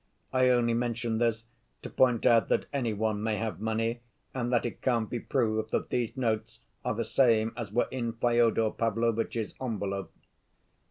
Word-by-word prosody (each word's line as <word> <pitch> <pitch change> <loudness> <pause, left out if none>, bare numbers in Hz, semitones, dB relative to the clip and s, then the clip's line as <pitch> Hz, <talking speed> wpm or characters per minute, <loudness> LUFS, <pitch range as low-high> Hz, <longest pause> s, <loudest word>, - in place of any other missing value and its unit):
I 130 -1 +4
only 120 -2 +3
mention 115 -1 -1
this 115 -1 0 0.4
to - - -6
point 125 -3 +3
out 115 -2 +5
that - - +1
any 125 -5 0
one 105 0 -1
may 110 -1 0
have 110 -2 -3
money, 115 +2 -1 0.3
and 120 -2 -2
that 120 -1 +2
it 120 - -5
can't 115 -4 +1
be 120 - -3
proved 110 -5 0
that - - -1
these 120 +1 -1
notes 115 -2 -2 0.2
are - - -1
the 115 - -1
same 115 -1 +3
as 115 -4 -5
were 120 +3 +1
in 120 -3 -2
Fyodor 115 -1 +2
Pavlovitch's 115 0 -1
envelope. 100 -7 -3
115 Hz, 170 wpm, -29 LUFS, 110-120 Hz, 0.4 s, out